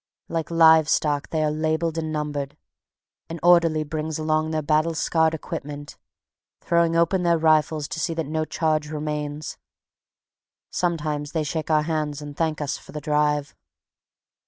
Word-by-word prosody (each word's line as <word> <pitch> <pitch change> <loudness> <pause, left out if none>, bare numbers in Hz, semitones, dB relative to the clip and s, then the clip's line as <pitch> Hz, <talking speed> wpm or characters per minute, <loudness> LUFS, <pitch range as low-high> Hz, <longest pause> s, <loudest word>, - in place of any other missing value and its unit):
Like 165 -1 -3
live 160 -2 +6
stock, 145 -2 +1
they 155 -1 0
are 150 - +1
labeled 160 +1 -1
and 160 -1 -3
numbered. 145 -2 -3 0.7
An 165 +1 -6
orderly 170 -3 +5
brings 155 0 -4
along 155 0 0
their 155 -1 -1
battle 155 +2 +1
scarred 160 0 +2
equipment, 145 -3 -7 0.6
throwing 170 -1 +2
open 170 +3 +2
their 170 -1 +3
rifles 155 -1 +2
to - - -4
see 165 +1 -1
that 165 -1 -2
no 155 +2 -1
charge 155 -1 -1
remains. 150 -1 -4 1.1
Sometimes 150 -4 -2
they 160 -2 0
shake 155 +2 -3
our 155 -1 +3
hands 150 -2 -2
and 145 -1 -8
thank 160 -1 -1
us 145 - -2
for - - -15
the 150 - -4
drive. 150 -1 0
155 Hz, 155 wpm, -24 LUFS, 150-160 Hz, 1.1 s, live